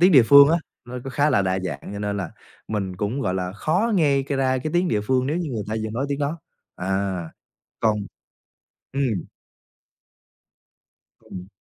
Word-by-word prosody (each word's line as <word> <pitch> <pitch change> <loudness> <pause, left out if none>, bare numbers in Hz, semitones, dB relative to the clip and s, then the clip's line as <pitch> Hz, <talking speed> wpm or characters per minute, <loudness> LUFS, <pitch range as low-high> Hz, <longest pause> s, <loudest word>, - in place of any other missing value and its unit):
Tiếng 180 +1 +6
địa 135 - +9
phương 140 +4 +8
á, 165 - +4 0.3
nó 125 +1 -6
cũng 135 - -5
khá 145 +4 +2
là 100 - +3
đa 95 0 0
dạng, 70 -6 -4
cho 100 - -5
nên 105 0 -2
là 95 -4 -3 0.4
mình 100 -4 -3
cũng, 105 +9 -2
gọi 95 -7 -1
là, 90 -1 -2
khó 180 - 0
nghe 145 -7 +3
c 135 - -14
ra 130 -2 +1
cái 155 +5 -3
tiếng 175 +1 +2
địa 105 - +1
phương 130 +4 +1
nếu 150 +4 0
như 170 -4 -2
người 110 -5 -3
ta 110 - -2
vừa 110 - -3
nói 120 +6 -2
tiếng 140 -1 -2
đó. 145 +3 -2 0.4
À, 95 -1 -1 0.6
còn 110 -2 +2 1.0
ừm. 140 - 0 2.2
Ừm. 90 -1 -9
125 Hz, 190 wpm, -23 LUFS, 100-140 Hz, 2.2 s, địa